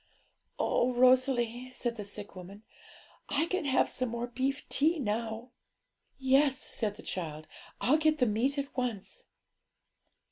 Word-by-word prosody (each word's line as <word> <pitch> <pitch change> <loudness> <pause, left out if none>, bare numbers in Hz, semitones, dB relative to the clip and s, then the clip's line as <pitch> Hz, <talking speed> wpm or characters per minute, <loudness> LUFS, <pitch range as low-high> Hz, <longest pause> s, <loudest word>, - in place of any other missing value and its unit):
'Oh, 250 +1 +2
Rosalie,' 250 -1 +3
said 240 -2 -3
the 210 - -5
sick 205 0 -7
woman, 190 +3 -10 0.7
'I 290 +3 +2
can 370 0 -2
have 270 -1 +3
some 255 -2 -2
more 235 +1 -3
beef 260 +3 -2
tea 320 +4 +2
now!' 230 -1 -3 0.7
'Yes,' 270 +1 +3
said 215 -7 -3
the - - -12
child; 155 -4 -4 0.4
'I'll 285 +5 +4
get 310 0 +3
the 250 - +3
meat 240 +6 +1
at 280 0 -4
once.' 250 - -4
250 Hz, 140 wpm, -31 LUFS, 220-275 Hz, 0.7 s, I'll